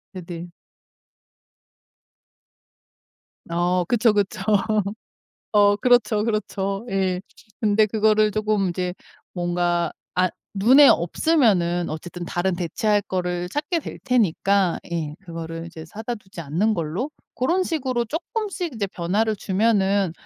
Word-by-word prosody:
애들. 175 -1 -7 3.0
어. 175 +1 +1
그쵸, 230 +1 +3
그쵸. 205 -2 -1 1.1
어. 205 -1 +5
그렇죠. 225 -2 +3
그렇죠. 205 -1 -2
예. 190 -2 0 0.4
근데 215 0 +3
그거를 215 0 +3
조금 210 -2 0
이제 180 0 -2 0.4
뭔가 175 -1 0 0.2
아 185 0 +3 0.3
눈에 255 +8 +7
없으면은 175 - +2
어쨌든 175 +3 -6
다른 175 +2 -1
대체할 205 +4 0
거를 180 -2 -2
찾게 305 - -1
될 - - -8
테니까 200 -6 +2
예 160 -3 -3
그거를 165 -2 -7
이제 165 -1 -9
사다 220 +8 -5
두지 190 -5 -11
않는 170 +9 0
걸로 170 - -3 0.2
그런 345 +9 +1
식으로 260 -8 -1
쪼끔씩 360 - -3
이제 215 -3 -1
변화를 200 +4 -1
주면은 200 -2 +1
195 Hz, 235 characters per minute, -23 LUFS, 175-220 Hz, 3.0 s, 눈에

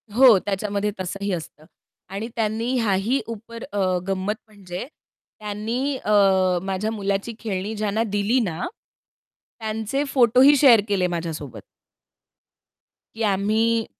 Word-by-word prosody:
हो, 250 -5 +8
त्याच्यामध्ये 205 +1 -1
तसंही 195 +2 -3
असतं. 155 -2 -7 0.4
आणि 200 +4 -4
त्यांनी 225 +2 -1
ह्याही 220 +4 +1
ऊपर 230 +1 -8
अ, 205 - -2 0.3
गंमत 195 +2 -1
म्हणजे 195 -2 -7 0.5
त्यांनी 220 +7 -2
अ, 210 - -3 0.5
माझ्या 195 +3 -2
मुलाची 200 +1 -2
खेळणी 205 -1 -3
ज्यांना 215 +1 0
दिली 205 +5 +2
ना, 180 -7 -2 0.9
त्यांचे 220 +5 -2
फोटोही 255 +3 +6
शेअर 250 -6 +7
केले 195 -3 +1
माझ्यासोबत. 165 -6 -5 1.5
की 225 - -7
आम्ही 220 +3 +1
210 Hz, 110 wpm, -23 LUFS, 195-230 Hz, 1.5 s, हो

